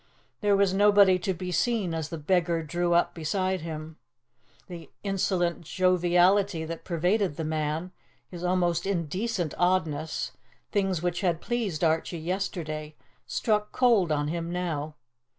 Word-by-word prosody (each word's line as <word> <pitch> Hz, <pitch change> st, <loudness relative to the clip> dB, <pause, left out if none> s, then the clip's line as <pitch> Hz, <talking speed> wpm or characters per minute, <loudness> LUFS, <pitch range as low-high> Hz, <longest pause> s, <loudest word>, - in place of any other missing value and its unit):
There 205 Hz, -2 st, +3 dB
was 195 Hz, -1 st, +3 dB
nobody 200 Hz, -2 st, +5 dB
to 190 Hz, +2 st, -1 dB
be 180 Hz, 0 st, -4 dB
seen 195 Hz, 0 st, 0 dB
as 160 Hz, -2 st, -3 dB
the 165 Hz, -, -5 dB
beggar 170 Hz, +1 st, +1 dB
drew 175 Hz, +2 st, 0 dB
up 175 Hz, -, +2 dB
beside 185 Hz, +3 st, -1 dB
him. 160 Hz, -1 st, -7 dB, 0.7 s
The 170 Hz, -2 st, -9 dB
insolent 185 Hz, -3 st, 0 dB
joviality 180 Hz, +1 st, +2 dB
that 165 Hz, 0 st, -6 dB
pervaded 180 Hz, +1 st, 0 dB
the 160 Hz, -, -4 dB
man, 155 Hz, +3 st, -2 dB, 0.4 s
his 175 Hz, -1 st, -9 dB
almost 180 Hz, -1 st, +1 dB
indecent 185 Hz, 0 st, -1 dB
oddness 160 Hz, -4 st, 0 dB, 0.4 s
things 195 Hz, -5 st, 0 dB
which 175 Hz, +1 st, -1 dB
had 175 Hz, -4 st, +1 dB
pleased 210 Hz, -10 st, -2 dB
Archie 165 Hz, +1 st, +1 dB
yesterday 160 Hz, -3 st, -4 dB, 0.3 s
struck 210 Hz, -2 st, 0 dB
cold 225 Hz, -10 st, +3 dB
on 145 Hz, -1 st, 0 dB
him 170 Hz, +1 st, -3 dB
now. 160 Hz, -4 st, -3 dB
175 Hz, 135 wpm, -27 LUFS, 160-190 Hz, 0.7 s, nobody